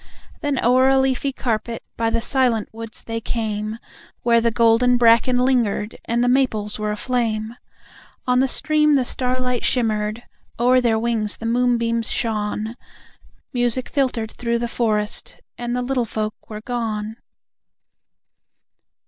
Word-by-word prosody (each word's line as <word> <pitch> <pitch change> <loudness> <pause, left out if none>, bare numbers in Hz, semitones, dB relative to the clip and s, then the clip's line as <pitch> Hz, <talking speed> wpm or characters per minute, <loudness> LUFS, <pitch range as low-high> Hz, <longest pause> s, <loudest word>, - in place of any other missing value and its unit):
Then 290 -3 -1
o'er 255 +2 +5
a 270 - +4
leafy 265 +1 +1
carpet, 235 -3 -3
by 230 0 0
the 230 0 0
silent 240 -3 +1
woods 225 0 -9
they 230 0 -4
came, 215 -1 -3 0.5
Where 235 -1 +4
the 235 - +2
golden 230 +2 +3
bracken 235 +1 +4
lingered 240 -5 +1
and 235 +1 0
the - - +2
maples 235 -5 +1
were 210 0 -1
aflame. 225 0 -2 0.7
On 250 0 +2
the 265 - +3
stream 300 +2 +3
the 260 -2 +2
starlight 250 -1 -1
shimmered, 220 -2 0 0.4
o'er 250 +1 +4
their 230 -2 +2
wings 220 -2 0
the 230 - -8
moonbeams 235 -1 +1
shone, 215 0 -2 0.8
Music 245 0 0
filtered 250 -6 -1
through 235 -1 -2
the 235 0 -2
forest 215 -2 -1 0.2
and 240 0 -3
the 250 - -1
Little 250 -1 0
Folk 215 -1 -5
were 215 -1 -7
gone! 220 -2 -3
235 Hz, 140 wpm, -21 LUFS, 220-250 Hz, 0.8 s, o'er